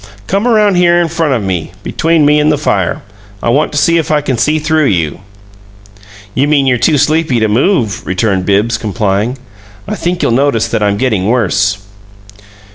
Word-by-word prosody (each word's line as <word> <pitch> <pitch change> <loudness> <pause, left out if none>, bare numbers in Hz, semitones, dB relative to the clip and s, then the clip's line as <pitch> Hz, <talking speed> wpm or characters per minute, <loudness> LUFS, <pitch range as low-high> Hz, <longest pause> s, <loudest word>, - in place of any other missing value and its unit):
Come 200 - -1
around 210 -5 +3
here 175 -1 +3
in 170 -1 0
front 160 -4 0
of 115 - -2
me 90 -4 -3
between 165 -2 +1
me 150 +1 +4
and 150 +1 +2
the 150 - +1
fire. 145 0 -1 0.4
I - - 0
want 145 +6 +1
to - - -2
see 170 +3 +3
if 160 - -3
I 155 -1 +2
can 135 -3 -2
see 150 +6 +1
through 155 0 +1
you." 85 - -1 1.1
"You 135 +6 +1
mean 145 -2 +2
you're 125 -2 +1
too 155 +4 +2
sleepy 150 -3 +1
to 110 - +1
move," 115 - 0
returned 95 0 -1
Bibbs, 105 +3 +1
complying. 105 +3 -2 0.5
"I - - -3
think 175 +1 -2
you'll - - +1
notice 130 -2 +1
that - - -1
I'm 100 -1 +1
getting 110 -6 0
worse." 105 -3 +1
135 Hz, 190 wpm, -12 LUFS, 105-155 Hz, 1.1 s, me